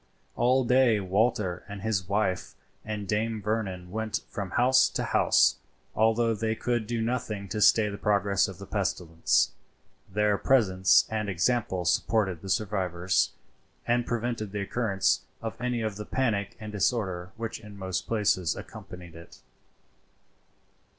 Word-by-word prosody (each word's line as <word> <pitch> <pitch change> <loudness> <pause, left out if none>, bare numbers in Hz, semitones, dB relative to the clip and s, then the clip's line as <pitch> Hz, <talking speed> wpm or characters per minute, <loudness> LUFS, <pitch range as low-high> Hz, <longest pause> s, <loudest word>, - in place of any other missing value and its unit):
All 130 +2 +3
day 125 -3 +4
Walter 95 -1 0
and 100 -1 -7
his 100 -5 -1
wife 100 -3 -1 0.3
and 105 -2 -5
Dame 110 +2 -1
Vernon 100 -4 -3
went 110 +1 -2
from 100 -2 -4
house 130 +6 +4
to - - -2
house. - - +3 0.4
Although 115 +1 +2
they 110 +1 -1
could 120 -1 -1
do 120 -1 -2
nothing 110 -4 -3
to 105 - -3
stay 110 0 +5
the 100 -1 -5
progress 100 -1 +2
of 95 -3 -8
the 100 - -9
pestilence, 85 -9 0 0.6
their 105 0 +2
presence 95 -8 +4
and 105 -2 -2
example 95 -1 0
supported 95 -1 +1
the 95 - -8
survivors, 95 -4 0 0.5
and 120 0 +1
prevented 115 -3 -2
the 105 - -2
occurrence 100 -2 +1 0.2
of 115 +1 -6
any 125 -1 -1
of 110 -2 -3
the 105 - -6
panic 105 -6 -1
and 105 -1 -7
disorder 95 -4 -1
which 115 -1 -4
in 105 -2 -12
most 95 -3 -3
places 100 -6 +1
accompanied 90 -2 -10
it. 85 +1 -13
105 Hz, 145 wpm, -28 LUFS, 95-115 Hz, 0.6 s, stay